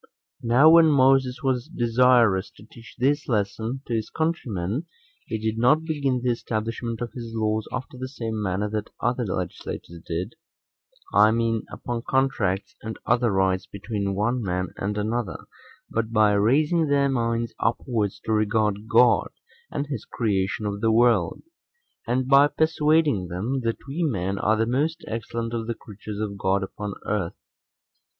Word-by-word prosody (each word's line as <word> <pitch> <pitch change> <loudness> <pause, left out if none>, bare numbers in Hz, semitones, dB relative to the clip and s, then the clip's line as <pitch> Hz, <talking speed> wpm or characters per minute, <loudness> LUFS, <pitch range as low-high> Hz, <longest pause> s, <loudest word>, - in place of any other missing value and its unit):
Now 120 +6 +5
when 165 0 +8
Moses 135 -2 +3
was 130 -1 0
desirous 120 - +3
to 105 - -14
teach 115 -1 -15
this 145 +4 +1
lesson 110 +3 -1
to 120 - -4
his 110 -1 -1
countrymen, 130 - -2 0.4
he 110 - -2
did 110 +1 -2
not 145 +7 +4
begin 140 -6 -1
the 125 - +2
establishment 115 0 -3
of 120 - -4
his 115 -2 -7
laws 110 -1 0
after 130 0 -6
the 130 - -4
same 115 -5 -4
manner 100 +1 -1
that 105 -1 -3
other 120 0 0
legislators 85 -2 -5
did; 90 +6 -3 0.8
I 105 - +6
mean, 115 0 0
upon 120 -1 -4
contracts 120 -8 0
and 110 0 -6
other 120 0 +2
rights 95 -1 +1
between 100 -1 -3
one 120 +5 0
man 90 -2 -2
and 105 +2 -3
another, 110 +2 -2 0.4
but 115 0 -2
by 105 -2 +4
raising 150 +11 +3
their 140 -1 +3
minds 115 -3 -1
upwards 115 -2 -1
to 110 - -2
regard 105 -1 +1
God, 120 +1 +4 0.4
and 145 - -3
his 140 -7 -5
creation 100 -2 -1
of 100 0 -3
the 115 - +3
world; 115 -6 +3 0.6
and 125 +2 0
by 140 +1 +7
persuading 150 - +2
them, 110 +10 -2
that 115 - 0
we 145 +6 -3
men 100 - -1
are 110 +2 +2
the 115 - +2
most 150 +8 -1
excellent 115 +1 -4
of 115 -1 -3
the 115 - -2
creatures 105 -1 -9
of 100 -2 -4
God 95 0 +1
upon 100 +1 -6
earth. 100 -6 -2
115 Hz, 155 wpm, -25 LUFS, 105-130 Hz, 0.8 s, when